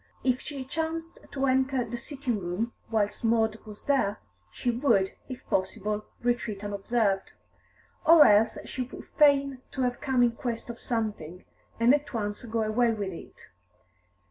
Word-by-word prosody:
If 255 -1 +1
she 275 -3 -6
chanced 325 +3 -4
to 275 -1 -1
enter 260 -1 +2
the - - -5
sitting 250 -2 -3
room 190 +6 -3 0.2
whilst 215 -1 0
Maud 225 -1 +2
was 210 -1 -10
there, 260 -8 +1 0.3
she 245 - -1
would, 230 -6 +2 0.2
if 255 - -8
possible, 210 +3 -1 0.2
retreat 235 -4 -1
unobserved; 200 -1 0 0.7
or 320 -1 +8
else 210 +2 +5
she 260 - -5
would 250 - -7
feign 280 -3 +5
to 265 - -2
have 245 -1 -1
come 265 -4 +2
in 240 - +4
quest 235 0 -4
of 235 - -12
something, 210 -7 -3 0.3
and 235 +3 +6
at 290 -3 -1
once 205 +1 -2
go 225 -1 -1
away 230 +2 +2
with 200 -3 -3
it. - - -12
235 Hz, 155 wpm, -28 LUFS, 210-265 Hz, 0.7 s, or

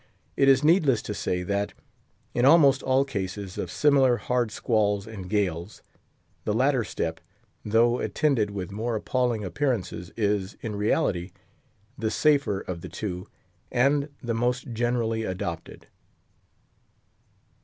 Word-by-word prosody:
It 135 - +4
is 135 +1 +5
needless 150 - +4
to 105 - -4
say 90 -3 -2
that, 100 +2 -2 0.6
in 120 - +1
almost 140 -2 +6
all 130 +1 +2
cases 100 -5 -5
of 90 - -3
similar 135 - +4
hard 125 -2 0
squalls 105 -3 0
and 100 -5 -8
gales, 95 -2 -2 0.6
the 105 - -1
latter 130 +1 +2
step, 80 -5 -3 0.4
though 115 +3 +3
attended 135 -9 +1
with 100 -2 -5
more 110 +3 -2
appalling 120 0 0
appearances 95 -4 -2
is, 100 -2 0
in 110 -2 -4
reality, 100 - 0 0.7
the 110 -1 0
safer 140 -7 +2
of 85 -2 -6
the - - -8
two, 90 -4 -5 0.4
and 140 +4 +2
the 120 -1 -1
most 125 +2 -1
generally 115 -1 0
adopted. 90 -4 -5
110 Hz, 130 wpm, -26 LUFS, 100-130 Hz, 0.7 s, almost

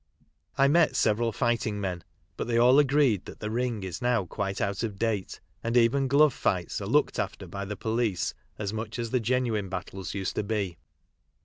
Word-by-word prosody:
Imetseveralfightingmen, 115 - +2 0.3
butthey 115 0 0
all 125 +4 +6
agreed 140 -8 +3
that - - -10
the 105 0 -4
Ring 120 -3 -1
is 95 +5 -5
now 120 -5 +1
quite 95 +2 -3
out 100 0 -1
of 110 -4 -3
date, 110 -3 -2 0.2
and 115 +1 +1
even 130 +4 +3
glove 140 +1 +5
fights 90 -6 -1
are - - -4
looked - - +2
after - - -3
by 100 +3 -5
the 105 +1 -5
police 110 -4 -1 0.2
as 105 -1 -3
much 110 +1 -4
as 115 -1 -3
the 125 - +2
genuine 115 -4 0
battles 95 0 -5
used 95 -1 -2
to - - +1
be. 100 -6 -2
110 Hz, 170 wpm, -28 LUFS, 100-125 Hz, 0.3 s, all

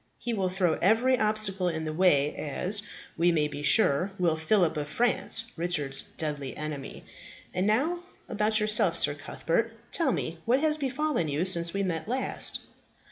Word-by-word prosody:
He 240 - -4
will 190 -4 -1
throw 180 -3 0
every 235 +7 +3
obstacle 210 -4 +2
in 160 -1 -4
the 155 - -4
way, 150 -5 +2
as, 180 +7 +1 0.4
we 175 +1 +3
may 155 -3 +1
be 145 -1 -8
sure, 180 +2 +3
will 170 -3 +1
Phillip 165 +1 +2
of 150 -1 -3
France, 230 +2 +1
Richard's 150 -6 -1 0.2
deadly 145 -4 -4
enemy. 150 -2 -7 0.5
And 185 +2 -1
now 290 +12 +1 0.3
about 215 +1 0
yourself, 210 -5 +3
Sir - - +4
Cuthbert; 170 +9 -3 0.2
tell 325 -6 +1
me 165 -6 -4
what 250 +3 +2
has 310 0 +2
befallen 280 - -2
you 150 +4 -1
since 170 -1 +2
we 200 - -1
last 165 -3 -3
met." 255 +3 +2
180 Hz, 165 wpm, -27 LUFS, 160-220 Hz, 0.5 s, Sir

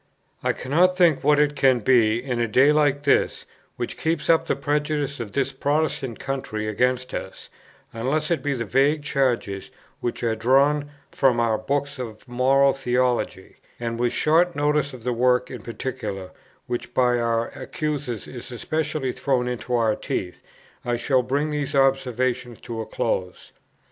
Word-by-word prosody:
I - - +2
cannot 175 +8 +2
think 170 -6 +4
what 150 +1 +4
it 145 0 +2
can 130 -3 +3
be, 115 -1 +3
in 125 -3 -2
a 120 - +1
day 130 +7 +5
like 145 -2 +2
this, 140 - +2 0.3
which - - -5
keeps 160 -1 +1
up 165 - +2
the - - +1
prejudice 145 0 -1
of 110 -4 -6
this 135 -1 0
Protestant 145 -2 -1
country 130 -6 -4
against 125 +4 0
us, - - -7 0.4
unless 140 +8 -1
it 165 -5 +1
be 140 0 -1
the 115 -2 -3
vague 140 +6 +2
charges 125 -9 -1 0.3
which 120 - -3
are 115 -1 +1
drawn 140 +5 +3 0.2
from 130 -4 +2
our 115 -2 +2
books 140 +3 -2
of 115 -1 -7
Moral 135 +3 +3
Theology; 125 -6 -1 0.2
and 115 -1 -3
with 120 0 +1
a - - -5
short 170 +3 +3
notice 145 0 +1
of 125 -3 -10
the 125 0 0
work 125 +1 +2
in 125 -4 -7
particular 110 -5 -5 0.3
which 120 +1 -5
by 125 -1 +3
our 115 0 0
accusers 145 -7 -4
is 125 0 -9
especially 150 +1 -2
thrown 125 -2 0
into 125 0 -2
our 110 -2 +2
teeth, 90 -1 -4 0.4
I 120 0 -1
shall 130 +2 +2
bring 140 +5 -1
these 145 -2 -2
observations 130 -3 +1
to 115 -1 -5
a 110 - -6
close. 90 -1 -3
130 Hz, 165 wpm, -24 LUFS, 120-145 Hz, 0.4 s, day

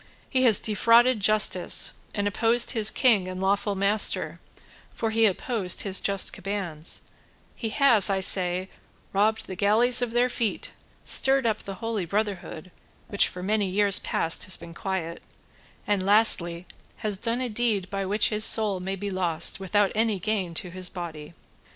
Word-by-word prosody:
He 260 - 0
has 220 -5 +4
defrauded 230 +3 +2
justice, 205 -3 +3 0.2
and 205 -1 -2
opposed 230 +3 +1
his 220 -4 +2
king 215 -8 +1
and 185 0 -7
lawful 200 +1 -1
master, 200 +2 0 0.5
for 225 - -4
he 225 0 +2
opposed 200 -1 -2
his 195 -2 -1
just 195 -1 0
commands; 190 -5 -6 0.5
he 225 - -6
has, 230 -5 +5
I 195 -1 -1
say, 185 0 +2 0.4
robbed 215 +3 0
the 185 - -9
galleys 225 +6 +3
of 245 - -2
their 240 +2 0
feet, 235 -4 -4 0.3
stirred 270 -1 +3
up 220 -2 -1
the 195 - -9
Holy 220 -1 -5
Brotherhood 190 -3 -5 0.4
which 200 - +2
for 180 - -9
many 205 0 -1
years 200 +1 +2
past 165 - -1
has 185 - -1
been 170 0 -12
quiet, 170 -2 -6 0.6
and, 205 -2 -1
lastly, 185 -4 +3 0.4
has 205 -2 -2
done 235 +2 -1
a 255 - -3
deed 215 -4 -2
by 195 0 -4
which 205 +3 0
his 215 0 +3
soul 215 -4 +5
may 190 +2 -5
be 200 +1 -6
lost 175 -3 -1
without 195 +1 -1
any 220 -1 -1
gain 185 -3 -4
to 180 +2 -3
his 185 0 -4
body." 165 -4 -9
200 Hz, 165 wpm, -24 LUFS, 185-220 Hz, 0.6 s, has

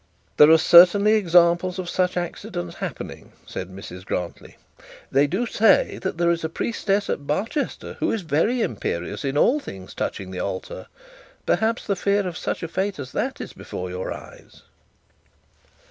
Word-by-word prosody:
'There 150 - +8
are 160 - +8
certainly 180 +6 +7
examples 175 -2 +3
of 185 -1 -4
such 180 0 0
accidents 90 - -5
happening,' - - -7
said 90 - -6
Mrs 95 -1 -9
Grantly. 90 -2 -5 0.5
'They 140 +2 +4
do 190 +11 -1
say 225 -1 +3
that 190 -3 -3
there 170 0 +3
is 170 -1 -2
a 160 - -1
priestess 200 +2 -1
at 140 - -3
Barchester 225 - -3
who - - +1
is 220 -4 -2
very 170 - +1
imperious 100 -2 -3
in 140 +1 -1
all 265 - +4
things 95 - -10
touching 95 -1 -4
the 90 - -5
altar. 95 0 -5 0.6
Perhaps 225 +2 +1
the 200 - 0
fear 200 +1 +1
of 175 - -5
such - - -3
a - - -2
fate 190 +4 -2
as 130 -3 -7
that - - -2
is - - -7
before 90 0 -7
your 90 +1 -4
eyes.' - - -11
170 Hz, 165 wpm, -23 LUFS, 130-200 Hz, 0.6 s, There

